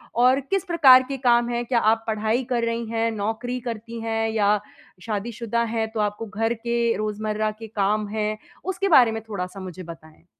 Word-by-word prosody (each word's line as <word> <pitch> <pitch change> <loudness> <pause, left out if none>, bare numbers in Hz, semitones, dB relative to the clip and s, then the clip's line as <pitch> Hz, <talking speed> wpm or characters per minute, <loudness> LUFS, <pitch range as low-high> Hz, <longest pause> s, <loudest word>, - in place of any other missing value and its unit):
और 255 +3 +4
किस 380 +8 -1
प्रकार 270 -7 +7
के 270 - -3
काम 240 0 +4
हैं? 240 0 -2
क्या 235 -1 +2
आप 225 +1 +2
पढ़ाई 220 +3 0
कर 240 -2 0
रही 230 0 -2
हैं, 230 0 0
नौकरी 225 +4 -3
करती 230 +1 -6
हैं 225 0 -1
या 210 -1 +2 0.5
शादीशुदा 230 +2 -2
हैं, 220 -1 0
तो 220 - -4
आपको 210 +2 -1
घर 225 +2 -1
के 235 0 0
रोज़मर्रा 215 0 -2
के 225 - -8
काम 210 0 0
हैं। 215 0 -2 0.3
उसके 380 +1 -1
बारे 240 -3 +6
में 225 0 -4
थोड़ा-सा 195 -1 -5
मुझे 185 -1 -8
बताएँ? 160 -1 -13
225 Hz, 185 wpm, -24 LUFS, 210-235 Hz, 0.5 s, प्रकार